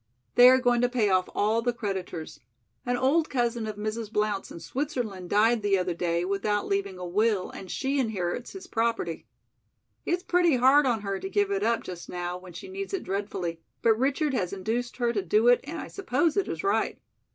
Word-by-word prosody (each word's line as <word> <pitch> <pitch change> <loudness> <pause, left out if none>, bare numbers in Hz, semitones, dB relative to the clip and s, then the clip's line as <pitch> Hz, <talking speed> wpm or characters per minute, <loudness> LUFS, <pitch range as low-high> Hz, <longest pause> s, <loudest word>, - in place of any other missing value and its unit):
"They 245 +1 +9
are 260 - +7
going 245 -2 +2
to 245 - +3
pay 230 -5 +1
off 185 -1 +2
all 220 +3 +2
the 245 +1 +1
creditors. 190 -7 -5 0.5
An 245 0 +1
old 285 +6 +2
cousin 240 -3 0
of 215 - -4
Mrs. 215 +1 -4
Blount's 210 -2 -1
in - - -8
Switzerland 225 - -4
died 225 +2 +3
the 200 -1 +2
other 180 -1 -1
day 170 0 -1
without 200 +2 0
leaving 195 -1 -1
a 180 - -6
will, 205 +2 +1
and 190 - -9
she 275 +6 -1
inherits 220 -2 -2
his 380 -1 -9
property. 225 - -2 0.8
It's 355 +1 -1
pretty 350 -4 +3
hard 265 +3 +5
on 230 -4 +1
her 200 -1 -3
to 385 - -5
give 405 0 +1
it 395 0 0
up 235 - +1
just 175 -2 -8
now 175 0 -3
when 180 -1 -12
she 170 - -8
needs 390 +1 -4
it 385 - -4
dreadfully, 190 -4 -3 0.2
but 225 - +6
Richard 275 +5 0
has 185 -8 -1
induced 225 +5 -3
her 240 -2 +1
to 205 - 0
do 210 +6 +2
it 245 - +6
and 325 +4 -5
I - - -6
suppose 330 -4 0
it 400 - +1
is - - -4
right. 395 - +1
225 Hz, 210 wpm, -27 LUFS, 195-260 Hz, 0.8 s, They